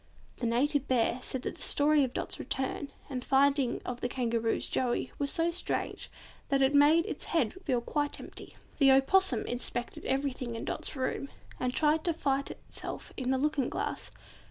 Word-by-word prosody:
The 240 - -1
Native 280 +4 +1
Bear 245 -1 +2
said 260 0 -4
that - - -4
the - - -11
story 295 0 +3
of 260 - -1
Dot's - - -2
return 270 +2 -1 0.2
and 255 -2 -4
the - - -11
finding 275 -2 +3
of 245 0 -5
Kangaroo's 235 -2 0
Joey 245 -2 0
was 285 -1 +1
so 330 +3 +1
strange 350 - -3 0.4
that 275 -1 +3
it 265 +2 +3
made 300 +4 +6
its - - -5
head 290 - +1
feel 250 -4 +1
quite 290 +4 -1
empty. - - -9 0.2
The 270 -2 +7
Opossum 270 -1 +3
inspected 245 0 -3
everything 265 -3 -1
in 225 - -5
Dot's - - -3
room, 265 +1 -2 0.3
and 250 0 0
tried 310 +3 +2
to 340 - +2
fight 275 -3 0
itself - - -7
in 255 -2 -2
the 265 - +3
looking 290 -1 +1
glass. - - -3
270 Hz, 180 wpm, -30 LUFS, 250-290 Hz, 0.4 s, The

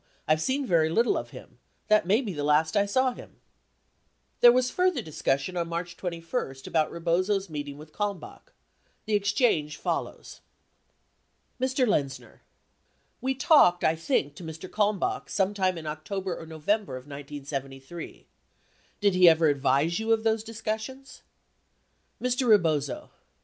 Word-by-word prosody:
I've 155 0 +3
seen 270 - 0
very 165 -6 +3
little 230 +9 +2
of - - -4
him. - - -13 0.3
That 215 -4 +3
may 210 +6 +3
be 210 -7 -4
the 145 -2 -4
last 150 +2 +2
I 200 0 +3
saw 260 +5 +2
him. - - -14 1.0
There 240 - +9
was 255 +1 +1
further 365 -9 +1
discussion 140 +1 -1
on 170 -1 -1
March 170 +1 -4
21, 170 - -4
about 155 -2 +1
Rebozo's 185 +3 0
meet 145 -1 -4
ings 140 0 -8
with 155 +1 -13
Kalmbach. 205 -3 -5 0.5
The 215 - -2
exchange 200 - +1
follows: - - -4 1.2
Mr. 260 0 +1
Lexzner. 140 -10 -2 0.8
We 265 +1 -1
talked, 260 - +5
I 160 - +3
think, 160 - 0
to - - -9
Mr. 160 +3 -7
Kalmbach 205 -1 -1
some 195 0 0
time 185 -3 0
in 160 - -8
October 180 +5 -4
or 165 - -9
November 160 +1 -1
of 130 - -10
1973. 140 +1 -7 0.8
Did 200 -2 +3
he 180 -1 +7
ever 160 -1 +4
advise 140 +4 +1
you 220 0 -1
of 220 0 0
those 220 -1 +1
discussions? 225 +4 -6 1.0
Mr. 250 +1 0
Rebozo. 155 - +2
180 Hz, 145 wpm, -27 LUFS, 155-220 Hz, 1.2 s, There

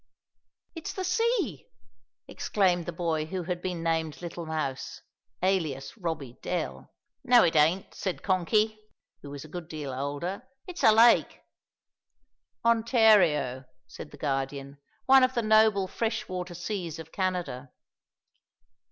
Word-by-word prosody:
"It's 330 -2 -6
the 375 - -4
sea!" 365 - 0 0.6
exclaimed 180 -5 0
the - - -2
boy 165 -2 -1
who 185 +2 -4
had 175 0 -4
been 180 -3 -4
named 160 -3 -1
little 170 -1 -7
Mouse, 150 -5 -4 0.4
alias 165 -8 -1
Robbie 160 - -5
Dell. 180 - -4 0.3
"No, 245 -2 +6
it 165 - +2
ain't," 160 +5 +2
said 190 -3 -4
Konky, 210 +4 +1 0.4
who 145 - -10
was 140 +1 -8
a - - -11
good 170 +1 -7
deal 150 -5 -6
older; 145 - -4 0.2
"it's 360 -2 -7
a 220 - +8
lake." 230 +2 +4 1.2
"Ontario," 215 - +3 0.2
said - - -10
the - - -13
Guardian, 140 0 -3 0.3
"one 265 0 +7
of 255 0 +2
the 235 - 0
noble 215 -3 +4
fresh 225 +3 -2
water 180 -1 -5
seas 175 -2 -4
of 160 0 -10
Canada." 180 -9 -3
175 Hz, 135 wpm, -28 LUFS, 155-215 Hz, 1.2 s, a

